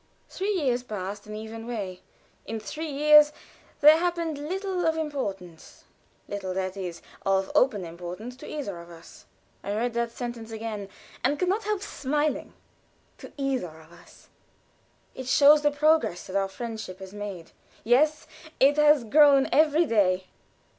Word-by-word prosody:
Three 390 +2 -4
years 260 -9 0
passed 205 -3 -6
an 210 - -7
even 225 +1 -8
way. 200 -6 -5 0.5
In 225 0 -4
three 310 +9 -6
years 300 +1 +6 0.5
there 305 +2 +8
happened 335 -3 -1
little 370 +4 -3
of 320 0 +1
importance 195 - -5 0.4
little, 190 -2 -4
that 190 0 -2
is, 180 -3 -6 0.2
of 195 0 +1
open 210 -8 +2
importance 180 +8 -8
to - - -11
either 230 - -5
of 170 - -14
us. 170 -1 -14 0.4
I 205 - -3
read 235 +2 -1
that 235 0 -1
sentence 235 -1 -6
again, 220 -3 -5 0.3
and 275 +4 +2
can 365 +2 0
not 410 +3 -1
help 420 -2 -1
smiling; 295 -2 -2 0.7
"to - - -11
either 255 - -2
of 160 +1 -18
us." 170 0 -18 0.8
It 260 - -8
shows 290 +3 +6
the 295 - +3
progress 300 - +1
that 185 - -8
our 195 -1 +1
friendship 220 -3 -6
has 190 0 -10
made. 200 -5 -7 0.3
Yes, 295 +7 +3 0.3
it 280 +2 +5
had 295 -7 +4
grown 285 -3 +6
every 310 +2 +4
day. 190 - +2
240 Hz, 155 wpm, -26 LUFS, 195-300 Hz, 0.8 s, there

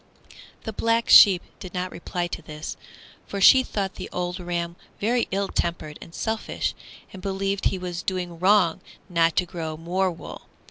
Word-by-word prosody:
Black 230 0 +1
Sheep 190 -4 +9 0.2
did 185 -2 -9
not 180 0 -2
reply 175 0 -3
to 175 - -5
this, 155 -1 -7 0.5
for 200 - -4
she 260 +6 +8
thought 200 -6 -3
the - - -6
old 180 +1 -3
ram 170 -1 -3 0.2
very 235 +3 +1
ill 195 +1 -1
tempered 155 -5 -3
and 165 - -11
selfish, 220 -1 -2 0.4
and 190 - -9
believed 195 +1 -2
he 190 - +2
was 180 -1 -5
doing 180 -2 -3
wrong 185 -3 +4 0.3
not 165 -2 +2
to 180 - +2
grow 165 -3 -5
more 180 +4 0
wool. 170 - -9
180 Hz, 165 wpm, -25 LUFS, 170-195 Hz, 0.5 s, Sheep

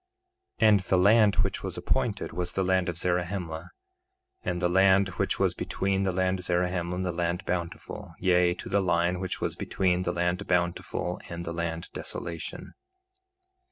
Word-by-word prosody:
3:23 110 - +6
And 105 -2 +6
the 95 0 +1
land 105 +2 +5
which - - 0
was - - -5
appointed - - -1
was 90 +1 -3
the 95 - 0
land 95 -1 +2
of 85 - -4
Zarahemla, 90 -2 -2 0.7
and 90 - -2
the 90 - +2
land 95 +2 +4
which 85 - -1
was - - +2
between 95 0 -1
the 95 - +1
land 95 +1 0
Zarahemla 90 0 0
and 95 +1 -2
the 90 - 0
land 85 +1 -2
Bountiful, 90 +1 -4
yea, 90 -1 +3
to - - -8
the 100 - +2
line 90 0 +1
which 95 -1 -3
was - - -1
between 90 -1 0
the 90 -1 -1
land 90 +3 -1
Bountiful 90 -1 -1
and 85 0 -5
the 85 - -4
land 85 -1 -3
Desolation. 85 - -6
90 Hz, 170 wpm, -28 LUFS, 85-95 Hz, 0.7 s, 3:23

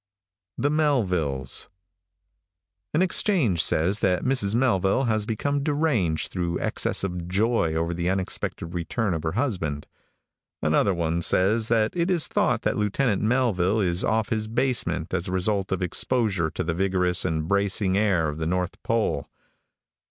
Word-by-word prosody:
THE 145 - +1
MELVILLES. 90 - 0 1.2
|AN 160 +5 +2
exchange 175 - +2
says 90 +7 +1
that 90 -4 +1
Mrs. 120 -6 +1
Melville 115 -2 +2
has 110 -3 0
become 140 +6 -1
deranged 140 - 0
through 85 -2 -2
excess - - -1
of 90 -3 -4
joy 100 -3 +1
over 85 +1 -1
the 85 +1 -1
unexpected 95 -3 -3
return 90 +4 -2
of 80 - -2
her 80 0 -2
husband. 90 - -2 0.7
Another 85 +5 +2
one 85 0 -1
says 105 +6 +2
that 110 +2 +1
it 170 +1 0
is 175 -4 +3
thought - - 0
that - - 0
Lieutenant 105 +1 0
Melville 110 -4 +1
is 90 -3 0
off 110 +2 0
his 110 -3 -1
basement 110 -9 -1
as 85 - -1
a - - -4
result 95 +1 -1
of 95 -1 -1
exposure 95 -2 0
to 90 - -4
the 85 0 -1
vigorous 90 -1 +1
and 80 -3 -1
bracing 100 0 +1
air 100 -6 +2
of 75 +1 -5
the 80 - -2
north 90 0 -2
pole. 110 -11 -1
95 Hz, 150 wpm, -25 LUFS, 85-115 Hz, 1.2 s, is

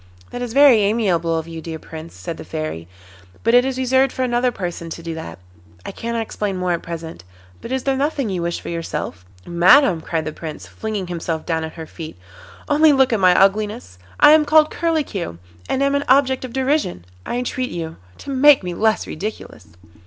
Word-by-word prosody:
'That 245 - -5
is 245 -2 -4
very 280 -3 +7
amiable 190 -6 +1
of 160 0 -4
you, 165 -1 -7
dear 160 0 -6
Prince,' 160 +1 -10
said 90 0 -6
the - - -8
Fairy, 80 +2 -5 0.6
'but 230 - +2
it 245 0 +7
is 265 0 -2
reserved 260 +1 +2
for 260 - -2
another 245 0 +1
person 175 -5 -5
to 165 +1 -7
do 165 0 -4
that. 160 0 -7 0.5
I - - -5
cannot 230 0 -3
explain 205 -3 -3
more 180 -1 -1
at 170 - -1
present. 165 - -7 0.4
But - - -8
is 260 -1 -1
there 270 -1 +1
nothing 275 -2 -1
you 180 -2 -2
wish 170 0 -2
for - - -8
yourself?' 165 - -5 0.2
'Madam,' 175 - +5
cried 160 -1 -3
the 155 - -4
Prince, 155 -2 -8
flinging 215 -3 -4
himself 165 -2 -4
down 160 -1 -1
at 160 - -6
her 160 -1 -7
feet, 160 - -9 0.5
'only 300 +1 +5
look 265 -3 +3
at 220 - +1
my 180 -1 +5
ugliness. 195 - +1 0.2
I 295 - +8
am 310 0 +6
called 310 +1 +4
Curlicue, 290 - -2 0.3
and 265 - +1
am 280 0 +2
an 280 0 0
object 265 -1 +3
of 255 - -6
derision; 265 - -1 0.2
I - - -4
entreat 250 +1 -2
you 165 -2 -6 0.2
to 280 - -8
make 275 -2 +6
me 180 -1 -4
less 220 +4 +1
ridiculous. 210 +7 -7
205 Hz, 205 wpm, -20 LUFS, 165-260 Hz, 0.6 s, I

